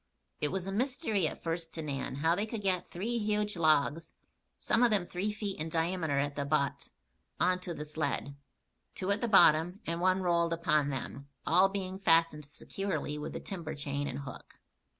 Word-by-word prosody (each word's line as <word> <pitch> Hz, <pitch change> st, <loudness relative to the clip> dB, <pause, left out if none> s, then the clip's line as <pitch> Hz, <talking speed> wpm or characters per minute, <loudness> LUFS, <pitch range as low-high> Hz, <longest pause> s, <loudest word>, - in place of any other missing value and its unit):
It 150 Hz, -, +1 dB
was 185 Hz, +3 st, -3 dB
a 195 Hz, -, -3 dB
mystery 225 Hz, -, 0 dB
at -, -, -7 dB
first 165 Hz, 0 st, -3 dB
to 160 Hz, -, -4 dB
Nan 135 Hz, -3 st, -3 dB
how 160 Hz, +4 st, +2 dB
they 205 Hz, +5 st, -1 dB
could 220 Hz, -2 st, -5 dB
get 185 Hz, -2 st, 0 dB
three 230 Hz, +7 st, -2 dB
huge 210 Hz, -1 st, 0 dB
logs, 155 Hz, 0 st, +2 dB, 0.4 s
some 230 Hz, -, +1 dB
of 245 Hz, -, +6 dB
them 205 Hz, -5 st, +2 dB
three 185 Hz, +4 st, -2 dB
feet 205 Hz, -3 st, -4 dB
in 160 Hz, +1 st, -3 dB
diameter 165 Hz, -2 st, 0 dB
at 140 Hz, 0 st, 0 dB
the 145 Hz, -, -1 dB
butt, 140 Hz, -1 st, 0 dB, 0.5 s
on 180 Hz, 0 st, +3 dB
to 180 Hz, -2 st, -6 dB
the 150 Hz, -, -5 dB
sled; 150 Hz, -2 st, -2 dB, 0.6 s
two 190 Hz, +1 st, -1 dB
at 200 Hz, -, 0 dB
the 235 Hz, -, +1 dB
bottom 175 Hz, -2 st, +5 dB
and 170 Hz, +1 st, -2 dB
one 185 Hz, +1 st, +3 dB
rolled 170 Hz, -1 st, +2 dB
upon 155 Hz, -4 st, +2 dB
them, 140 Hz, +1 st, -5 dB, 0.2 s
all 185 Hz, +4 st, +5 dB
being 190 Hz, -1 st, -4 dB
fastened 165 Hz, -4 st, +3 dB
securely 150 Hz, +1 st, -4 dB
with 150 Hz, -, -5 dB
the -, -, -4 dB
timber 165 Hz, -5 st, -6 dB
chain 145 Hz, 0 st, -3 dB
and 135 Hz, +1 st, -4 dB
hook. 130 Hz, -3 st, -10 dB
170 Hz, 190 wpm, -31 LUFS, 150-195 Hz, 0.6 s, of